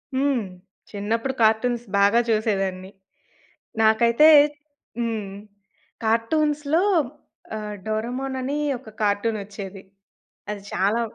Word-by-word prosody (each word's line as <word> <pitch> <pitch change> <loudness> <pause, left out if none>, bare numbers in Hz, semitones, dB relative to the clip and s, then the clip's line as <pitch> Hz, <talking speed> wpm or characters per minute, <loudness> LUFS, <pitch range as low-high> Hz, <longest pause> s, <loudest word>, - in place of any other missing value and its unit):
హ్మ్. 270 -2 +1 0.5
చిన్నప్పుడు 225 +5 -2
కార్టూన్స్ 235 +2 +2
బాగా 200 +4 +5
చూసేదాన్ని. 195 -4 -1 0.9
నాకైతే 235 +6 +5 0.7
హ్మ్. 220 -4 -2 0.7
కార్టూన్స్‌లో 295 +7 +1 0.7
ఆహ్, 210 -1 -5
'డోరేమోన్' 245 +5 -3
అని 275 +3 -2 0.2
ఒక 235 -3 -13
కార్టూనొచ్చేది. 205 -2 -2 0.7
అది 205 -1 -5
చాలా 205 +5 +1
220 Hz, 80 wpm, -23 LUFS, 205-250 Hz, 0.9 s, బాగా